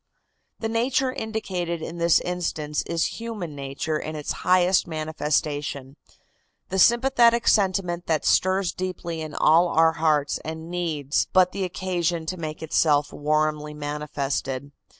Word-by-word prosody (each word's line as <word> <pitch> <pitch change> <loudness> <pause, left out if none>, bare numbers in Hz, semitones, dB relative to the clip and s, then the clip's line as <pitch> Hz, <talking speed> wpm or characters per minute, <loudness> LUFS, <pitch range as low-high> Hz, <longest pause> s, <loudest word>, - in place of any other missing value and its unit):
The 225 - -3
nature 250 +3 +1
indicated 185 -8 -3
in 170 +1 -6
this 170 -1 +4
instance 160 -4 -2
is 170 +5 -1
human 215 -9 -5
nature 140 +2 -3
in 155 0 -5
its 150 -1 -4
highest 180 0 +3
manifestation, 150 -3 -2 0.7
the 190 - -1
sympathetic 235 +1 +4
sentiment 185 -4 +1
that 160 -2 0
stirs 185 0 +2
deeply 180 -3 -4
in 155 -1 -6
all 165 +3 +5
our 165 -1 +4
hearts 155 -3 +1
and 160 +1 -7
needs 160 -5 -1
but 185 -1 +5
the 195 - -2
occasion 175 -2 -2
to 185 +3 -4
make 155 -2 -6
itself 150 -2 +2
warmly 150 0 0
manifested. 145 -2 -3
165 Hz, 130 wpm, -24 LUFS, 150-185 Hz, 0.7 s, all